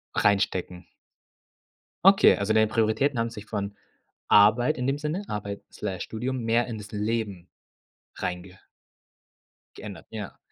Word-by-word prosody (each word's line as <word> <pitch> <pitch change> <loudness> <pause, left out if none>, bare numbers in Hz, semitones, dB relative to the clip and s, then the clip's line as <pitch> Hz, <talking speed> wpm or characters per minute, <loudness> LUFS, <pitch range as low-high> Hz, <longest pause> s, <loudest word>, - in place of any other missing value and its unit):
Reinstecken. 95 -3 0 1.2
Okay, 195 0 +7
also 100 +2 0
deine 110 0 +4
Prioritäten 115 +5 +1
haben 115 0 0
sich 110 -2 -10
von 100 -1 -4 0.5
Arbeit 110 +8 +5
in 125 - -2
dem 135 +2 0
Sinne, 155 +7 -3
Arbeit 100 -1 -5
Slash 95 -2 -4
Studium 125 +4 -3
mehr 115 +1 +2
in 115 -3 -5
das 105 0 -10
Leben 105 -4 -3 0.7
reinge 90 +1 -5 1.2
geändert, 100 -3 -9
ja. 105 -4 -7
110 Hz, 125 wpm, -26 LUFS, 100-120 Hz, 1.2 s, Okay